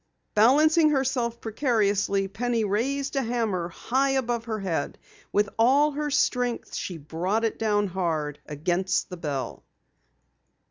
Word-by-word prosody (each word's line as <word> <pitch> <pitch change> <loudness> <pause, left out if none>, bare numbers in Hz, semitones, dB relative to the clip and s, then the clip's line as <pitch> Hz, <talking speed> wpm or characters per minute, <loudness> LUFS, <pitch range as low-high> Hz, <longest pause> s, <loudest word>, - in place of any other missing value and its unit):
Balancing 305 +8 +5
herself 260 -4 0
precariously, 205 -5 +1
Penny 230 +3 -1
raised 270 +8 -1
a 270 - +2
hammer 225 -8 -1
high 265 +9 0
above 240 -3 -1
her 220 -2 -3
head. 170 -6 -2 0.3
With 205 0 +2
all 280 +6 +5
her 295 +1 -2
strength 250 -4 0
she 180 - -4
brought 175 +9 -1
it 225 - -2
down 210 -2 +2
hard 165 -6 -2
against 180 +6 -1
the 180 - -6
bell. 145 -5 -4
225 Hz, 130 wpm, -26 LUFS, 190-260 Hz, 0.3 s, Balancing